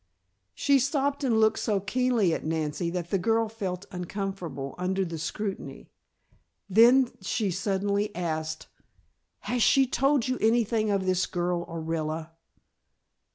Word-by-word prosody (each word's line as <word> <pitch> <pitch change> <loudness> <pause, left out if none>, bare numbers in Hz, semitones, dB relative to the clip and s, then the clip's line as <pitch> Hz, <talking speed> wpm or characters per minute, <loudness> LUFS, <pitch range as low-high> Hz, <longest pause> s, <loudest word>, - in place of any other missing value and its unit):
She 280 -1 +3
stopped 280 +2 0
and 235 -5 +2
looked 220 0 +3
so 210 -3 0
keenly 225 -2 +1
at - - -3
Nancy 160 +2 -2
that 170 -1 -4
the 195 - +2
girl 225 +4 +2
felt 195 -4 -5
uncomfortable 180 -6 -5
under 190 +1 0
the 165 -2 -5
scrutiny. 195 +5 -5 0.8
Then 235 +5 +6
she 200 +1 -1
suddenly 200 +2 0
asked: 160 -2 -3 0.8
"Has 245 0 -2
she 270 +4 +5
told 270 0 +1
you 255 0 -1
anything 225 -1 +2
of 195 -2 0
this 185 -1 +1
girl, 175 -1 -1
Orilla?" 160 -1 -3
195 Hz, 130 wpm, -27 LUFS, 175-230 Hz, 0.8 s, Then